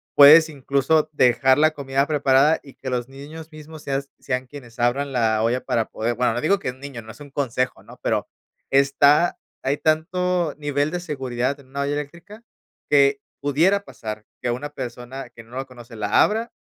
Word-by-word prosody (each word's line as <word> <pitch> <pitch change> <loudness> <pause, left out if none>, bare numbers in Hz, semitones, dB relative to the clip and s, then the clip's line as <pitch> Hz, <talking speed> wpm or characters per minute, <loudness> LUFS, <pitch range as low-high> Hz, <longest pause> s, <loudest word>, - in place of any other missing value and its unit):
puedes 155 +3 +9
incluso 145 +2 +1
dejar 130 -1 +4
la 155 +1 +4
comida 140 -1 -1
preparada 145 0 +3
y 140 - -14
que 130 - -6
los 125 0 -2
niños 150 +4 -10
mismos 155 0 -11
seas 140 0 -2
sean 130 -1 -3
quienes 125 -4 -12
abran 135 +4 +1
la 110 -4 +1
olla 120 +3 +1
para 115 - 0
poder 115 +2 -2
bueno, 125 -1 +1
no 120 - -2
digo 195 +6 +3
que 130 - -3
un 130 - -18
niño, 135 -4 -8
no 110 0 -11
es - - -16
un 145 -1 -11
consejo, 130 -2 -2
¿no?, - - -15
pero - - -1 0.4
está 140 +4 +4 0.2
hay 140 +2 0
tanto 170 +1 0
nivel 145 0 -1
de 180 - -2
seguridad 135 -4 -3
en 135 - -18
una 140 +2 -4
olla 140 +1 -1
eléctrica 170 +9 -7 0.5
que 140 -1 +4 0.2
pudiera 170 +8 +2
pasar 110 - -7 0.2
que 125 - -1
una 135 +5 -4
persona 130 -1 -7
que 115 -2 -13
no 120 +3 -11
la 135 - -3
conoce 120 -3 -13
la 105 0 +3
abra 225 +3 -1
140 Hz, 190 wpm, -22 LUFS, 125-150 Hz, 0.5 s, puedes